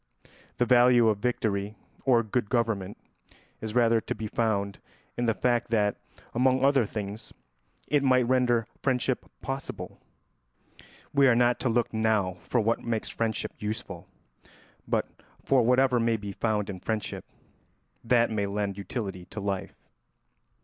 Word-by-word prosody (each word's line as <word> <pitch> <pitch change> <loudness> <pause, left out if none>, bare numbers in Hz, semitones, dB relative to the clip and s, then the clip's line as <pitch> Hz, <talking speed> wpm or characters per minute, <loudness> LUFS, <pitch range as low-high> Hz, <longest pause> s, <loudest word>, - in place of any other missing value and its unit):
The 120 - +2
value 120 -1 +5
of 105 -2 0
victory 105 -3 -1 0.3
or 120 -3 +4
good 110 0 -2
government 110 -5 -1 0.6
is 110 0 -5
rather 115 -2 +4
to - - -4
be 110 - -5
found 105 -3 -1 0.4
in 120 - -1
the 115 - +2
fact 120 0 +1
that, 105 -3 +2 0.4
among 130 +2 +3
other 135 -5 +3
things, 105 0 -6 0.5
it 145 -1 +2
might 130 -3 +3
render 120 -3 +2 0.2
friendship 130 -1 0 0.2
possible. 135 0 -5 1.1
We 140 -1 +5
are 125 - +5
not 120 0 +3
to 130 - 0
look 115 0 0
now 110 -4 +1
for 125 - 0
what 115 +1 0
makes 115 -2 -2
friendship 115 -2 -2
useful, 105 +1 -5 0.8
but - - 0 0.4
for 135 -2 +4
whatever 125 +1 +3
may 115 -1 +2
be 100 -1 -6
found 105 0 -1
in 95 -2 -6
friendship 110 +2 -3 0.8
that 115 -1 +3
may 100 -2 0
lend 100 0 -2
utility 95 -4 -5
to 100 - -8
life. 100 -2 -3
115 Hz, 145 wpm, -27 LUFS, 105-125 Hz, 1.1 s, value